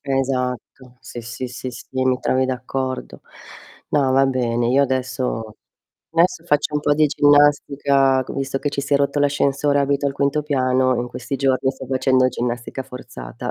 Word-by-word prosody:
Esatto. 130 -2 -3
Sì, 120 - -8
sì, 120 +2 -6
sì, 125 +1 -6
sì, 125 - -11
mi 130 -1 +1
trovi 130 0 +1
d'accordo. 130 0 -4 0.7
No, 140 -3 +2
va 135 +1 +4
bene, 120 -2 0
io 135 +3 +4
adesso 130 -4 -2 0.6
adesso 170 +2 +2
faccio 150 0 0
un 150 - +1
po' 145 - +2
di 155 0 +4
ginnastica 140 -2 +3
c - - -8
visto 135 0 -2
che 145 - -2
ci 140 - -2
si 140 +1 0
è - - +6
rotto 140 +1 0
l'ascensore, 145 0 +1
abito 140 0 0
al 135 - -1
quinto 140 +2 0
piano, 130 -3 +1
in 120 +1 -3
questi 125 +3 -5
giorni 130 0 +1
sto 130 -1 -9
facendo 130 0 +2
ginnastica 120 +1 -4
forzata. 95 - -8
130 Hz, 170 wpm, -21 LUFS, 125-140 Hz, 0.7 s, è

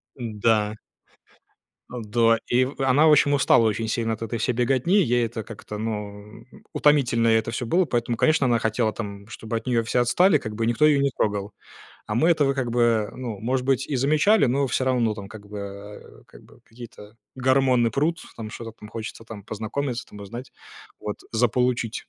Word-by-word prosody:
Да. 110 -3 0 1.1
Да. 115 -1 +1
И 125 +1 +3
в 135 +1 -7
она, 135 +4 +4
в 155 - +6
общем, 145 -1 +4
устала 130 -4 +4
очень 110 +1 -2
сильно 115 0 -1
от 110 - -8
этой 115 0 -4
всей 125 +2 0
беготни. 130 - +1
Ей 120 -2 +1
это 115 -1 -5
как-то, 105 -1 -9
ну, 105 0 -6 0.3
утомительно 125 -6 +3
ей 110 0 +5
это 115 - -5
всё 120 +1 -3
было. 180 +6 +2
Поэтому 120 -4 -1
конечно 155 -4 +3
она 120 -1 +3
хотела, 110 0 0
там, 100 -2 -7
чтобы 110 0 -6
от 115 - -8
нее 115 -2 +1
все 120 +2 0
отстали, 155 +8 +4
как 110 -3 -6
бы, 115 0 -1
никто 120 +6 +2
ее 150 -2 +4
не 140 -1 +1
трогал. 100 -1 -2 0.5
А 105 - -3
мы 155 +8 +3
этого 145 -5 +3
как 130 -3 -2
бы, 115 -3 +2
ну, 120 -5 -5
может 125 +3 -1
быть, 135 -1 +1
и 140 - -1
замечали, 155 - +3
но 135 +3 +1
всё 130 +1 -1
равно, 120 -4 +1
там, 100 -2 -9
как 105 -1 -12
бы, 105 0 -8
э, 100 +1 -10
как - - -17
бы - - -20
какие-то 115 -2 -13 0.2
гормоны 130 -2 +2
прут, 155 +7 0 0.2
там, 110 -2 -7
что-то 115 +1 -8
там 105 -1 -13
хочется, 115 0 -7
там, 110 -3 -10
познакомиться, 115 +5 -4
там 105 - -13
узнать. 120 +6 -9 0.5
Вот. 105 - -4 0.2
Заполучить, 120 0 0
115 Hz, 195 wpm, -24 LUFS, 110-130 Hz, 1.1 s, в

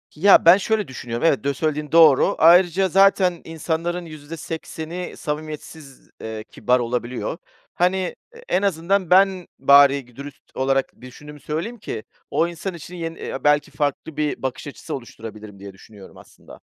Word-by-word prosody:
Ya, 190 +2 +5
ben 175 +3 +8
şöyle 215 +1 -1
düşünüyorum, 120 0 -5
evet, 140 - +1
dö 140 0 0
söylediğin 150 +1 -3
doğru. 160 -5 +5
Ayrıca, 175 +3 +5
zaten 190 -2 +3
insanların 165 +2 -3
%80'i 160 +2 -7
samimiyetsiz, 150 -2 -7
eee, 110 -1 -6
kibar 125 0 +1
olabiliyor. 120 +5 -3 0.4
Hani, 180 +1 0 0.2
e 475 - -16
en - - +1
azından 190 -1 0
ben 190 -1 +3
bari 140 0 +5
gi 120 -1 -22
dürüst 140 +1 -10
olarak 135 -1 -1
düşündüğümü 150 +4 -12
söyleyeyim 165 - -5
ki, 110 - -6 0.3
o 165 - +2
insan 175 +2 -6
için 170 +2 -10
yeni 165 -1 -6
eee, - - -6
belki 150 0 +2
farklı 145 +2 -3
bir 150 -1 -2
bakış 130 +2 -4
açısı 140 - -7
oluşturabilirim 110 -5 -10
diye 100 -1 -10
düşünüyorum, 100 0 -15
aslında. - - -16
155 Hz, 150 wpm, -22 LUFS, 135-175 Hz, 0.4 s, ben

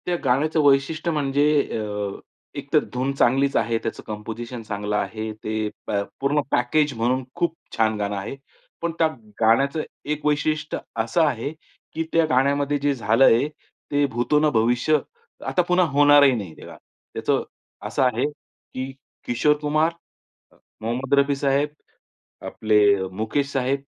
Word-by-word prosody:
त्या 180 - 0
गाण्याचं 145 +5 +2
वैशिष्ट्य 145 +4 +2
म्हणजे 145 -2 +1 0.4
अ, 105 -2 -4 0.4
एकतर - - +1
धुन 130 +2 -1
चांगलीच 135 +2 +2
आहे, 115 +1 +1
त्याचं 115 - -5
कंपोझिशन 115 +3 -6
चांगलं 105 -1 -3
आहे, 110 +1 -2
ते 110 0 -3 0.2
प - - -3 0.3
पूर्ण 145 +2 +1
पॅकेज 145 +4 +2
म्हणून 125 +3 +1
खूप 170 -1 0 0.2
छान 110 -1 +2
गाणं 105 0 -2
आहे. 100 +7 -5 0.5
पण 170 0 -1
त्या 165 - +5 0.3
गाण्याचं 135 +7 +3 0.3
एक 150 0 -7
वैशिष्ट्य 150 +1 0 0.3
असं 165 +9 +1
आहे, 140 -2 -1 0.4
की 165 - -1
त्या 165 -1 +4
गाण्यामध्ये 140 +2 +2
जे 145 0 +1
झालंय 115 +3 +4 0.4
ते 145 0 +3
भूतो 120 +5 +1
न 155 0 +3
भविष्य 120 +7 +3 0.5
आता 180 - +2
पुन्हा 180 0 +4
होणारही 145 -1 +6
नाही 100 -6 -4
हे - - -11
गाणं. - - -11 0.4
त्याचं - - 0 0.4
असं - - 0
आहे 125 +1 +2
की 135 -2 -9 0.3
किशोर 125 +5 +3
कुमार, 155 +2 +2 0.6
अ, - - -25 0.3
मोहम्मद 125 +5 -2
रफी 140 0 +2
साहेब, 140 +1 +1 0.8
आपले 110 -1 +2 0.2
अ, 95 -1 -3
मुकेश 110 +8 -2
साहेब 135 +1 0
135 Hz, 145 wpm, -23 LUFS, 115-145 Hz, 0.8 s, होणारही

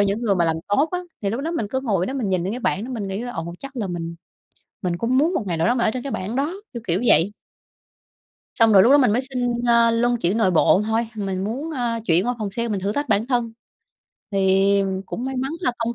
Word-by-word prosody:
những 200 +2 +1
người 205 -4 +2
mà 175 - +2
làm 160 -1 +1
tốt 275 +10 +2
á. 360 - 0 0.2
Thì 200 - 0
lúc 235 +5 -2
đó 320 - -3
mình 240 -11 -2
cứ 260 +2 -1
ngồi 200 -8 0
đó 265 - -4
mình 245 -7 -2
nhìn 185 -2 0
lên 195 - -2
cái 250 - -5
bảng 210 -1 -1
đó 260 - -7
mình 220 -5 -4
nghĩ 195 +4 -4
là 245 - -5
"Ồ, 170 +1 -5
chắc 275 -1 -10
là 215 -5 -2
mình 170 -2 -5 0.7
mình 175 -2 -1
cũng 245 +6 +1
muốn 330 +5 +2
một 240 - -1
ngày 170 -2 -1
nào 160 - +1
đó 240 - +3
mình 235 - +1
ở - - +3
trên 250 +1 -4
cái 275 - -5
bảng 210 +7 -3
đó." 290 +5 0 0.2
Kiểu 235 - -6
kiểu 180 +2 +1
vậy. 180 +7 +4 1.3
Xong 225 -1 +6
rồi 190 - +8
lúc 245 - +5
đó 290 - +8
mình 250 -7 +4
mới 245 +4 +2
xin, 245 -2 -1
ơ, 235 -1 +5
luân 240 +1 +2
chuyển 190 +2 0
nội 205 -5 +3
bộ 185 +3 +4
thôi, 225 +1 0
mình 195 -2 -3
muốn, 270 +10 -4
ơ, 240 -4 -1
chuyển 170 +3 +3
qua 245 - 0
phòng 205 -2 -3
sale 235 +3 -2
mình 205 -3 -1
thử 200 +2 -1
thách 285 +3 -3
bản 205 +1 +2
thân. 240 -3 0 0.8
Thì, 195 0 +3
ừm, 190 -1 -2
cũng 235 +6 -6
may 265 0 -3
mắn 265 +4 -2
là 250 - 0
công 235 +1 -2
225 Hz, 280 wpm, -22 LUFS, 195-250 Hz, 1.3 s, rồi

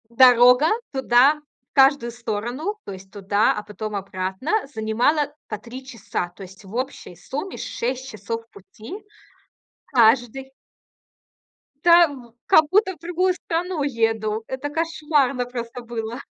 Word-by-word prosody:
Дорога 250 +3 +6 0.2
туда 265 +2 +4 0.3
в - - -88
каждую 270 -3 +4
сторону, 240 - -4
то - - -8
есть 190 0 -11
туда, 205 +1 +1
а 210 - -5
потом 210 0 -6
обратно, 190 - -4 0.2
занимала 245 +7 +1
по 215 - -4
3 245 +5 -10
часа. 215 -7 -4
То - - -10
есть 190 +2 -13
в 195 +4 -10
общей 255 -7 -4
сумме 290 - -6
6 260 +2 -4
часов 230 0 -6
пути 225 - -11 0.8
каждый 245 +2 +2 1.3
Та 345 0 +8
в 250 -6 -11
как 315 - +6
будто 380 -1 +3
в - - -28
другую 355 +3 0
страну 350 -1 -3
еду. 225 -4 0
Это 265 +2 -4
кошмарно 295 -5 0
просто 245 0 -6
было. 235 +1 -5
245 Hz, 130 wpm, -23 LUFS, 220-290 Hz, 1.3 s, Та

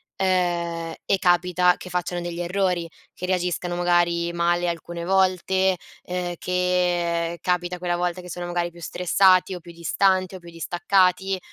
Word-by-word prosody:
ehm, 175 -3 0
e 195 - +2
capita 180 0 +3
che 180 - -10
facciano 175 0 -2
degli 175 0 -5
errori, 180 -1 0 0.2
che 180 - -6
reagiscano 180 -1 -1
magari 175 -1 +2
male 175 +1 +1
alcune 170 0 -4
volte, 190 0 +2 0.2
ehm, 180 -1 -3
che 175 -2 0
capita 180 0 -1
quella 175 0 -1
volta 175 +1 -2
che 180 - -11
sono 175 0 -5
magari 175 0 -2
più 170 0 -15
stressati, 185 +2 +3
o 180 - -5
più 170 0 -13
distanti 185 +3 +1
o 185 - -7
più 170 -1 -13
distaccati, 185 +3 +1
175 Hz, 150 wpm, -24 LUFS, 170-180 Hz, 0.2 s, capita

